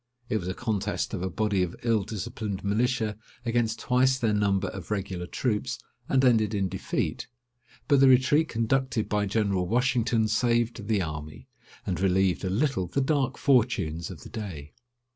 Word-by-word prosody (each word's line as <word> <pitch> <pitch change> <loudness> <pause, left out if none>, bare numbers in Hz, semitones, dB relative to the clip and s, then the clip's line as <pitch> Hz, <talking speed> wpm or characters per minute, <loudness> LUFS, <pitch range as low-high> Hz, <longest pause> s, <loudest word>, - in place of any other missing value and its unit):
It 110 - +1
was 90 -4 -5
a 95 - -3
contest 105 -5 -2
of 100 - -3
a 95 - -1
body 105 0 0
of 90 -2 -2
ill 115 -3 +2
disciplined 100 0 -5
militia 110 +1 0 0.3
against 115 -1 +1
twice 130 +1 +2
their 115 -4 +1
number 100 -2 +1
of 95 -4 -8
regular 95 -4 -3
troops, 110 -1 -1 0.3
and 135 0 +3
ended 110 -4 +3
in 95 -2 0
defeat; 95 +1 -3 0.6
but 140 -3 +4
the 135 - +7
retreat 135 +5 +4
conducted 120 0 0
by 105 -1 0
General 100 -3 0
Washington 120 -1 +2
saved 115 -1 0
the 105 -4 +1
army, 75 -1 -7 0.4
and 90 - -2
relieved 95 -2 +2
a 95 - -1
little 110 -2 0
the 115 - -1
dark 140 -1 +1
fortunes 115 - +1
of 80 -8 -9
the - - -10
day. 85 -10 -7
110 Hz, 165 wpm, -27 LUFS, 95-120 Hz, 0.6 s, the